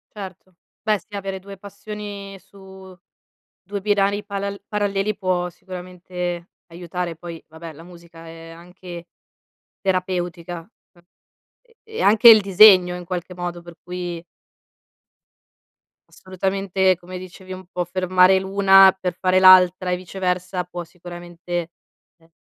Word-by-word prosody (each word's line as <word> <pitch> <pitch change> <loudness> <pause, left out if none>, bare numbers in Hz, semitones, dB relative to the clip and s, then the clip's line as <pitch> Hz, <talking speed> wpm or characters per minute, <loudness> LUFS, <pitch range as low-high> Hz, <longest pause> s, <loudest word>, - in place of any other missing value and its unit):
Certo, 185 -2 -10 0.3
beh 215 -2 +1
sì 205 +4 -13
avere 195 -1 -4
2 195 +1 -11
passioni 200 0 -9
su 190 -1 -15 0.6
2 200 +2 -6
binari 205 0 +1
palal 200 -1 -5
paralleli 205 0 -1
può 180 -2 -1
sicuramente 180 -1 -7 0.2
aiutare. 175 0 -5
Poi 165 0 -9
vabbè, 160 +1 -10
la 155 +2 -14
musica 170 -1 -14
è 165 0 -11
anche, 175 +1 -11 0.8
terapeutica. 180 -2 -2
Uhm 175 -2 -26 0.6
e 465 -1 -29
e 445 0 -7
anche 215 +3 +5
il 220 -2 +9
disegno 190 -2 +6
in 180 0 -8
qualche 180 0 -5
modo, 175 -1 -5
per 170 0 -13
cui 175 -1 -6 1.9
Assolutamente, 190 0 -1
come 180 +1 -9
dicevi 185 +1 -11
un 185 0 -8
po' 180 - -2
fermare 185 +1 +3
l'una 195 0 +6
per 180 -2 -4
fare 185 0 +3
l'altra, 185 -1 +6
e 180 - 0
viceversa, 180 0 -3
può 175 -1 -8
sicuramente, 175 0 -7 0.4
ehm, 165 -1 -28
185 Hz, 125 wpm, -21 LUFS, 175-195 Hz, 1.9 s, il